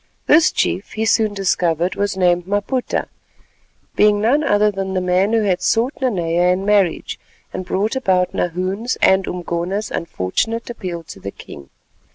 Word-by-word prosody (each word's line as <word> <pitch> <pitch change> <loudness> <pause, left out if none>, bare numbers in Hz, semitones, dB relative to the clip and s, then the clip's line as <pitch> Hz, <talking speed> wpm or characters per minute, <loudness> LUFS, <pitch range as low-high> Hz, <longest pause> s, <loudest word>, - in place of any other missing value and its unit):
This 310 +2 +5
chief, 190 - -1
he 220 +1 -1
soon 220 -2 +2
discovered, 180 -3 0
was 200 -1 -2
named 175 -1 +2
Maputa, 205 +6 -1 0.9
being 210 0 +4
none 255 +8 +2
other 210 -4 +3
than 195 -1 -4
the - - +2
man 185 +3 +1
who 225 -1 +2
had 185 -3 0
sought 235 +5 +1
Nanea 175 -7 +1
in 185 +2 -1
marriage 200 -5 +1 0.3
and - - -4
brought 205 +7 -1
about 185 -8 +1
Nahoon's 185 +7 -2
and 190 0 +3
Umgona's 180 +4 -3
unfortunate 225 - -2
appeal 180 -7 -6
to 155 - -11
the 100 - -6
king. 70 -7 -12
195 Hz, 155 wpm, -19 LUFS, 180-215 Hz, 0.9 s, This